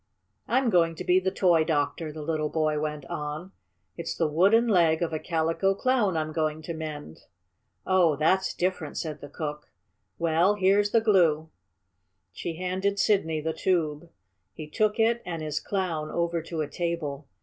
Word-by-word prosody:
"I'm 245 0 +2
going 165 -3 +3
to 180 - -6
be 180 +1 +4
the 190 0 0
toy 175 -4 +3
doctor," 155 0 -1
the 155 0 -7
little 155 -1 -1
boy 155 -1 0
went 150 -2 -4
on. 150 +6 -5 0.4
"It's 170 - -5
the 165 - +2
wooden 195 +10 +4
leg 170 -5 +3
of 165 - -2
a 155 - -1
Calico 165 +4 0
Clown 215 -6 +1
I'm 155 0 -2
going 155 0 -2
to 165 - -5
mend." 155 - -7 0.7
"Oh, 180 -5 +3
that's 185 +6 +1
different," 175 -4 -2
said 155 -2 -4
the 145 - -9
cook. 150 0 -6 0.5
"Well, 170 +5 +2
here's 205 +1 +3
the 225 +1 +3
glue." 165 -7 +3 0.8
She 165 - -5
handed 185 +3 -1
Sidney 165 -8 +1
the 160 +1 -2
tube. 165 -3 -1 0.5
He 155 - -7
took 210 +6 0
it 230 +1 +3
and 165 -3 -5
his 150 -1 -2
Clown 175 -6 -2
over 170 -1 -1
to 160 0 -4
a 150 - -2
table. 155 -5 -4
165 Hz, 170 wpm, -27 LUFS, 155-185 Hz, 0.8 s, be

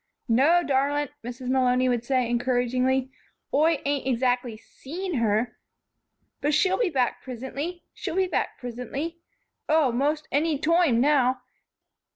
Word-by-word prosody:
"No, 285 +9 +4
darlint," 285 0 0
Mrs. 245 +2 -6
Malony 255 -1 +3
would 240 -2 0
say, 255 -1 +1
encouragingly. 250 +2 0 0.4
"Oi 310 +1 +3
ain't 280 -2 -1
exactly 245 -2 0
seen 335 - -6
her, 225 +1 0 0.8
but 295 +1 +2
she'll 375 +5 +2
be 465 -6 +2
back 260 -6 0
prisintly, 265 +8 -6
she'll 350 -4 -5
be 380 0 +3
back 365 - -2
prisintly 255 +7 -5 0.5
Oh, 305 -4 +4
most 295 +5 0
anny 300 +1 +1
toime, 320 -5 +3
now. 260 -3 +3
265 Hz, 130 wpm, -26 LUFS, 250-305 Hz, 0.8 s, No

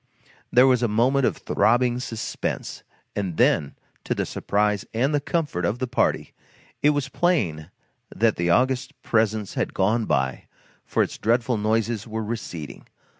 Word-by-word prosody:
There 125 +2 +6
was 130 -2 +4
a 120 - +2
moment 125 +5 +2
of - - -2
throbbing 120 +1 +2
suspense, 115 -3 -4 0.3
and 95 -5 -3
then, 70 -2 +2 0.3
to - - -1
the - - -1
surprise 105 0 0
and 135 +6 +1
the 145 - +2
comfort 145 - -2
of 105 +6 0
the 130 - -2
party, 125 - 0 0.5
it 145 - +5
was 145 -2 0
plain 90 - 0 0.4
that 115 0 +1
the 85 0 -1
august 130 +7 +1
presence 110 -2 0
had - - -2
gone 110 +4 +2
by, 65 -6 -1 0.4
for - - +2
its - - -6
dreadful 120 +1 +1
noises 110 +1 0
were 110 0 -3
receding. 95 - -6
115 Hz, 155 wpm, -24 LUFS, 105-125 Hz, 0.5 s, There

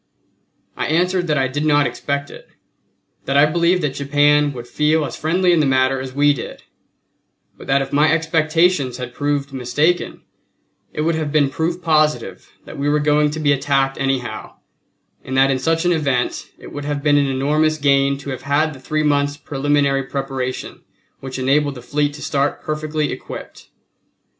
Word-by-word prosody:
I - - -2
answered 175 +3 +1
that 150 -2 +1
I 130 -1 +2
did 145 +4 -3
not 145 -1 +3
expect 140 0 -3
it; - - -13 0.8
that 135 +1 +1
I 145 - +7
believed 170 +3 +1
that 145 -3 -1
Japan 145 +1 +2
would 120 -3 -8
feel 150 +4 +1
as - - -6
friendly 175 +3 +1
in 170 - +3
the 150 - +2
matter 130 0 +2
as 130 0 -6
we 145 +2 +3
did; 125 - -8 0.9
but - - -13
that 135 0 +2
if - - -10
my 150 +2 +4
expectations 160 -3 +1
had 125 -1 -7
proved 145 0 -2
mistaken, 145 +7 0 0.7
it 150 - -4
would 165 +2 +1
have 155 -2 -2
been 145 -3 +2
proof 170 +5 -2
positive 150 - 0
that - - -10
we 145 +1 0
were 150 - +2
going 150 0 +2
to 155 +2 -5
be 145 -2 +2
attacked 135 -1 0
anyhow, 130 -5 -3 0.7
and 130 - -4
that 135 +1 +4
in 130 - 0
such 165 +4 0
event 145 -8 0
it - - -12
would 145 0 -6
have 145 -1 -3
been 145 -1 +4
an 140 - +1
enormous 150 +4 +1
gain 140 -1 +2
to 140 0 -7
have 130 - -6
had 150 +2 0
the 135 - -12
three 155 +4 -2
months' 145 -1 +1
preliminary 140 -1 0
preparation 135 -1 -5 0.4
which 130 -1 -7
enabled 140 +2 +1
the 125 - -9
fleet 145 +1 -1
to 150 - -9
start 140 0 -1
perfectly 155 0 -2
equipped. - - -9
145 Hz, 180 wpm, -19 LUFS, 135-155 Hz, 0.9 s, I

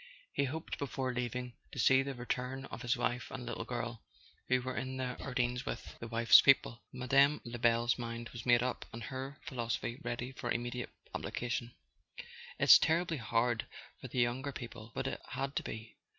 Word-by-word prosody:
He 140 - +2
hoped, 155 +4 -4
before 130 -2 -2
leaving, 125 0 -3 0.2
to - - -8
see 130 +3 +6
the 135 0 -4
return 125 +2 -3
of - - -6
his 120 -1 +1
wife 125 +1 -1
and 130 -2 -6
little 115 -1 -4
girl, 120 -2 -4 0.5
who 130 0 +4
were 130 +1 -4
in 130 +1 -3
the 125 -1 -2
Ardennes 125 -1 0
with - - -5
the 115 - -6
wife's 115 0 +7
people. 120 -3 +4
Mme. 135 +3 +4
Lebel's 120 +1 +2
mind 115 0 -4
was 120 - -8
made 120 -1 +5
up 125 0 -2
and 115 0 -7
her 130 +5 -5
philosophy 120 0 -3
ready 120 +2 -3
for 125 -2 -5
immediate 120 +1 -2 0.2
application. 120 0 -3 0.8
"It's - - +9
terribly 165 0 +2
hard 115 0 +1 0.3
for - - -7
the - - -7
younger 125 +3 +1
people; 115 -3 -8
but - - -2
it - - -3
had 135 +1 -2
to - - +2
be. 110 +1 -7
125 Hz, 180 wpm, -34 LUFS, 120-130 Hz, 0.8 s, It's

